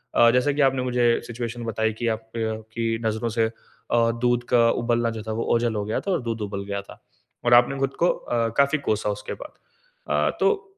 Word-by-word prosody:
अ, 120 - +7
जैसा 125 +4 +2
कि 145 - 0
आपने 135 -1 +3
मुझे 125 -1 +1 0.2
सिचुएशन 120 0 -5
बताई 110 0 0
कि 120 +2 -3
आपकी 110 0 -3
नज़रों 110 +1 -1
से 110 0 +2 0.4
अ, 115 -1 +3
दूध 120 0 +2
का 120 -1 +4
उबलना 120 0 +1
जो - - -5
था 110 - -5
वोह 115 +1 -2
ओझल 115 -1 0
हो 105 - -1
गया 110 - -1
था 195 - -2
और 175 - +1
दूध 115 -2 -4
उबल 100 -1 -4
गया 100 0 -3
था। 100 - -14 0.5
और 120 - +4
आपने 120 +3 +5
खुद 135 0 0
को 175 - +5
अ, 115 -1 -1
काफ़ी 140 +2 +4
कोसा 105 0 +1
उसके 105 0 -4
बाद। 300 - -9 0.6
अ, - - +1
तो 430 -1 +2
115 Hz, 210 wpm, -24 LUFS, 110-125 Hz, 0.6 s, अ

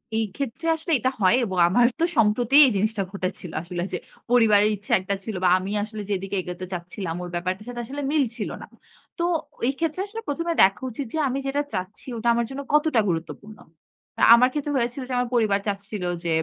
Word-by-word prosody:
এই 225 0 +1
ক্ষেত্রে 280 +5 -4
আসলে 320 +2 -6
এটা 255 - +1
হয় 190 +4 +5
এবং 190 -3 -4
আমারও 240 +7 +4
তো - - +5
সম্প্রতি 230 +4 +3
এই 260 - +3
জিনিসটা 210 +1 0
ঘটেছিল। 185 -2 -5
আসলে 175 0 -5
যে - - 0 0.3
পরিবারের 215 -4 +5
ইচ্ছা 205 +1 -4
একটা 200 +1 -2
ছিল 220 0 -5
বা 180 - +5
আমি 185 +2 -4
আসলে 215 0 -6
যেদিকে 195 0 -2
এগোতে 180 0 -6
চাচ্ছিলাম, 175 0 -5
ওই 175 - -6
ব্যাপারটার 185 +4 -3
সাথে 240 -1 -5
আসলে 280 +5 -6
মিলছিল 245 -7 0
না। - - -8 0.5
তো 340 - -1 0.4
ওই 245 - +2
ক্ষেত্রে 330 +2 -1
আসলে 450 +2 -7
প্রথমে 335 +3 -1
দেখা 195 +2 +3
উচিত 270 +5 -5
যে 320 - -2
আমি 265 +2 -1
যেটা 285 +2 0
চাচ্ছি 185 +1 -5
ওটা 230 +2 -3
আমার 235 0 +1
জন্য 270 +1 -5
কতটা 300 -4 +3
গুরুত্বপূর্ণ। 190 +6 -5 0.8
আমার 245 +2 +7
ক্ষেত্রে 295 -1 -2
হয়েছিল 240 +2 -1
যে - - -3
আমার 245 -1 0
পরিবার 215 -4 +3
চাচ্ছিল 200 0 -4 0.2
যে 170 - -2
220 Hz, 195 wpm, -24 LUFS, 195-260 Hz, 0.8 s, আমার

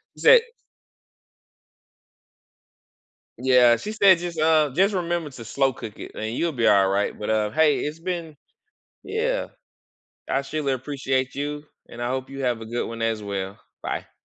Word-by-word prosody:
she - - -13
said 485 0 +8 3.0
Yeah, 125 -2 +5
she 210 - -6
said 195 -4 +6
just, 175 -1 -5
uh, 155 -2 +4
just 195 +5 +3
remember 170 -3 -2
to 125 -4 -10
slow 135 +4 +1
cook 110 -3 -9
it - - -7
and 110 +2 -4
you'll 170 +4 0
be 120 -5 0
all 100 -2 +5
right. 100 +1 0
But, 105 - -4
uh, 105 -1 +1
hey, 150 +5 +3
it's 150 +2 -4
been 170 -3 -4 0.7
Yeah, 485 +3 -1 0.8
I 135 - +1
surely 140 0 -2
appreciate 130 -1 -2
you, 145 +1 -4 0.2
and 120 - -10
I 120 - -1
hope 130 0 -3
you 135 0 -7
have 120 -2 0
a 115 - -7
good 120 +2 -3
one 115 0 -7
as 115 -1 0
well. 100 -1 -4 0.2
Bye. - - -4
135 Hz, 165 wpm, -24 LUFS, 115-165 Hz, 3.0 s, said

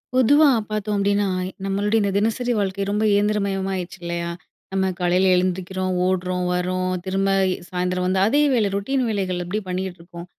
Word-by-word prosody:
பொதுவா 290 +5 +5 0.2
பார்த்தோம் 215 0 -2
அப்டின்னா 200 +1 +2 0.4
நம்மளுடைய 205 +3 0
இந்த 200 -1 0
தினசரி 225 +4 0
வாழ்க்கை 195 0 -1
ரொம்ப 210 +1 0
இயந்திரமயமாயிடுச்சு 195 -3 0
இல்லையா? 170 0 -3 0.4
நம்ம 190 0 +1
காலையில 180 +1 +2
எழுந்திருக்கிறோம், 185 +1 -1
ஓடுறோம், 180 -1 -1
வறோம், 185 +1 -1
திரும்ப 195 +1 0 0.4
சாயந்திரம் 180 0 -1
வந்து 190 +1 +1
அதே 280 +8 +3
வேல 220 -5 +2
ரூட்டின் 255 +7 0
வேலைகள் 190 -4 -1
அப்டி 180 +5 -2
பண்ணிட்ருக்கோம். 180 -2 -6
190 Hz, 140 wpm, -22 LUFS, 180-205 Hz, 0.4 s, பொதுவா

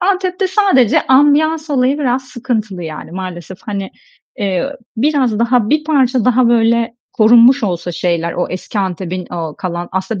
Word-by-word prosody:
Antep'te 375 0 0
sadece 370 - +3
ambiyans 300 +4 +3
olayı 270 +1 +1
biraz 260 -2 -1
sıkıntılı 230 -7 -4
yani. 155 -2 -7
Maalesef, 185 -1 -7
hani, 200 -2 -5 0.5
eee, 195 -2 -1 0.3
biraz 260 -3 +1
daha, 235 -2 +1
bir 305 0 +1
parça 260 -6 +1
daha 250 -1 +3
böyle 230 0 +2 0.2
korunmuş 235 +4 +5
olsa 175 -3 -2
şeyler, 170 -1 -1
o 175 - -2
eski 185 +3 -5
Antep'in 185 -1 -3
o 165 -3 -4
kalan 175 -1 -4
Aslında 190 +2 -3
230 Hz, 145 wpm, -15 LUFS, 185-270 Hz, 0.5 s, korunmuş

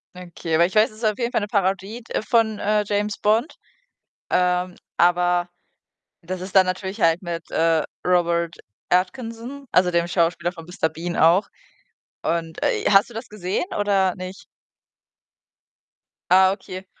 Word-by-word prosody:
Okay, 175 -2 -4
aber 170 +2 +5
ich 185 - -4
weiß, 215 +1 +4
es 215 - -16
ist 225 - -4
auf 215 +1 +1
jeden 240 0 -1
Fall - - +1
'ne 205 - -3
Parodie 200 +3 -1
d 225 - -3
von, 220 -2 +2
äh, 210 +1 +1
„James 205 0 -1
Bond“, 225 +8 +1 0.7
ähm, 180 0 +1 0.2
aber 175 0 +3 0.7
das 180 +2 -5
ist 185 +1 -5
da 190 - +8
natürlich 190 +3 -4
halt 165 +1 +3
mit, 170 -2 -5
äh, 165 -1 +2 0.2
Robert 170 -1 +1 0.3
Atkinson, 230 +8 -2
also 180 -1 +3
dem 170 0 +1
Schauspieler 170 0 +1
von 165 -3 -11
„Mister 175 -1 -1
Bean“ 165 +2 -5
auch. 170 +6 +4 0.8
Und, 165 -1 -2
äh, - - 0
hast 195 +1 +5
du 240 - -14
das 230 +2 -6
gesehen 195 - -2
oder 195 -3 +2
nicht? 185 +1 -8 1.9
Ah, 190 0 +6
okay. 190 -1 -7
185 Hz, 155 wpm, -22 LUFS, 175-210 Hz, 1.9 s, da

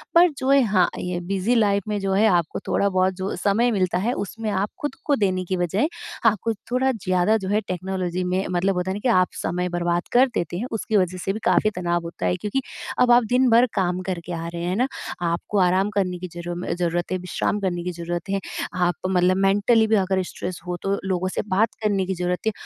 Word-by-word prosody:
पर 350 +1 +7
जो 260 -1 -2
है 275 0 +6
हाँ, 195 -5 +3
ये 180 -1 -3
बिज़ी 195 +5 +1
लाइफ़ 200 -3 +2
में 210 -1 -1
जो 195 -1 -1
है 205 +3 +4
आपको 175 -6 +1
थोड़ा-बहुत 190 -1 +2
जो 190 +1 -3
समय 225 +5 +2
मिलता 185 -4 +1
है, 220 +7 0
उसमें 220 +1 -4
आप 200 +1 0
खुद 290 -2 -3
को 290 - +3
देने 185 -5 0
की 185 +1 -2
बजाय 180 - +1 0.4
आपको 225 +1 +2 0.2
थोड़ा 260 +1 +2
ज़्यादा 185 -2 +1
जो 190 -3 -5
है 210 +2 +2
टेक्नोलॉज़ी 185 0 -2
में 185 +1 0
मतलब 185 +2 +1
होता 180 +1 -1
है - - -3
ना - - -4
कि 255 - +2
आप 185 -5 +4 0.2
समय 180 +1 -1
बर्बाद 175 0 -1
कर 250 +2 +5
देते 175 0 -2
हैं। 235 +7 -3
उसकी 220 0 0
वजह 185 -1 +1
से 195 - 0
भी 215 - -5
काफ़ी 215 - +3
तनाव 175 -1 -1
होता 170 - -5
है 90 0 +2
क्योंकि 210 +6 -1 0.4
अब 250 -1 +5
आप 240 0 +6
दिन-भर 250 -1 +5
काम 180 -2 0
करके 175 -1 -4
आ 165 0 -4
रहे 170 0 -4
हैं 180 +2 -1
ना? 250 +5 +2 0.3
आपको 170 +4 -1
आराम 185 +2 +3
करने 180 -3 0
की 185 - -5
ज़रू 175 0 -5 0.2
ज़रूरत 175 0 -1
है, 185 - +1
विश्राम 180 +3 -2
करने 180 -3 -2
की 180 - -2
ज़रूरत 175 +1 -5
है। 195 0 0 0.4
आप 180 -1 +1
मतलब 185 0 +3
मेंटली 205 +4 +3
भी 220 - +3
अगर 190 -1 +1
स्ट्रेस 180 0 -6
हो 175 0 -2
तो 195 0 0
लोगों 185 0 0
से - - -2
बात 210 +3 +2
करने 200 -3 +1
की 190 - -2
ज़रूरत 180 0 -1
है। - - +3
190 Hz, 230 wpm, -23 LUFS, 180-210 Hz, 0.4 s, पर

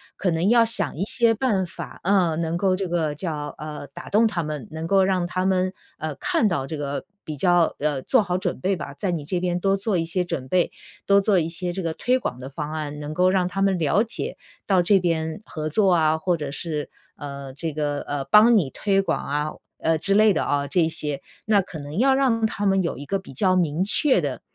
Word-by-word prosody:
可 185 - 0
能 165 +3 0
要 235 0 +6
想 230 0 0
一 180 - -1
些 230 +2 +3
办 215 -5 0
法， 170 - -9
呃， 180 -4 +2
能 165 0 -1
够 185 +1 +2
这 195 -1 -2
个 165 -3 -1
叫， 150 -2 -4
呃， 150 -1 -7
打 140 - -11
动 215 +3 +4
他 205 -6 0
们， 150 -5 -5
能 160 +1 -5
够 195 +1 +4
让 185 -2 +1
他 185 +1 -2
们， 185 0 +1 0.2
呃， 155 -2 -4
看 215 - +1
到 165 -9 -1
这 155 - -5
个 145 -1 -4 0.2
比 155 - -5
较 175 +2 +2
呃， 145 -2 -1
做 260 - +3
好 180 -2 -1
准 185 - -3
备 190 +1 0
吧。 145 -5 -7
在 165 +7 -3
你 160 -4 -3
这 180 +4 -1
边 175 0 -1
多 195 +2 +2
做 200 -1 -1
一 165 - 0
些 180 +2 0
准 135 -7 -4
备， 180 +4 +1 0.4
多 200 0 +6
做 195 -2 +3
一 165 -1 -1
些 175 +1 -3
这 190 - -3
个 165 -1 -2
推 255 +1 +1
广 125 - -4
的 130 +1 -7
方 150 +1 -5
案， 150 -2 -5
能 150 +1 -5
够 180 +2 +4
让 185 -2 +2
他 195 +2 -3
们 195 -1 +2
了 165 +7 +2
解 230 - -4 0.3
到 190 -3 +4
这 195 +2 +5
边 160 -1 -2
合 155 -1 -4
作 195 +4 +3
啊， 160 -2 +3
或 180 0 0
者 145 -3 -5
是， 150 -1 -3 0.3
呃， 140 -2 -7
这 160 +2 -4
个， 145 -1 -2
呃， 145 -1 -4
帮 215 - +6
你 160 -10 +1
推 195 +6 +1
广 195 - -2
啊， 150 +2 -1 0.3
呃， 160 0 +1
之 195 +5 +5
类 215 0 +5
的 - - 0
哦 145 0 0
这 175 +5 +2
一 160 - +2
些， 150 -3 -1 0.3
那 210 -2 +4
可 170 -3 -9
能 145 +3 -7
要 265 +4 +4
让 245 -5 +2
他 205 -1 -2
们 195 0 +3
有 170 - -3
一 145 - -7
个 195 - -1
比 190 - -12
较 185 +7 +2
明 170 -1 +1
确 260 +8 +4
的， - - -4
175 Hz, 260 characters per minute, -23 LUFS, 150-195 Hz, 0.4 s, 要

